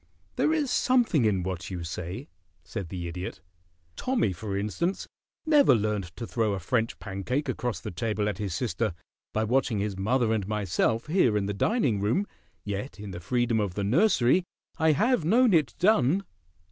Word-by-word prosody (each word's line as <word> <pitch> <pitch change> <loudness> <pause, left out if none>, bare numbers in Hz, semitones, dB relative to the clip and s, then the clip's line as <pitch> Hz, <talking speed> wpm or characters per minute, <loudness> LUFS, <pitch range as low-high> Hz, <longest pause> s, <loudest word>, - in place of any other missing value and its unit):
"There 310 - +2
is 300 -5 0
something 240 - +3
in 95 -4 +1
what 95 0 -4
you 90 -3 -5
say," 85 +2 -5 0.4
said 95 -5 -6
the 85 -1 -4
Idiot. 90 0 -6 0.6
"Tommy, 250 - 0
for 100 +3 -4
instance, 155 - -2 0.4
never 295 - +6
learned 105 -3 0
to 115 - -5
throw 110 -3 0
a 100 - -2
French 115 +5 -1
pancake 110 +9 -3
across 125 -3 -2
the - - -6
table 105 +3 -1
at 105 - -3
his 100 -5 -2
sister 115 -6 -1 0.4
by 110 - 0
watching 120 0 +1
his 100 0 -2
mother 110 +4 +1
and 105 -4 -1
myself 105 +2 0
here 150 - +3
in 100 - 0
the 100 - -2
dining 125 - +1
room, 115 - +1 0.4
yet 105 +5 -5
in 105 -1 -7
the 85 - -6
freedom 120 +4 0
of 100 -4 -2
the 100 - -1
nursery 140 - +3 0.4
I 160 -1 +4
have 235 - +2
known 230 +6 +4
it 160 -3 +2
done." 185 - +3
110 Hz, 175 wpm, -27 LUFS, 100-150 Hz, 0.6 s, never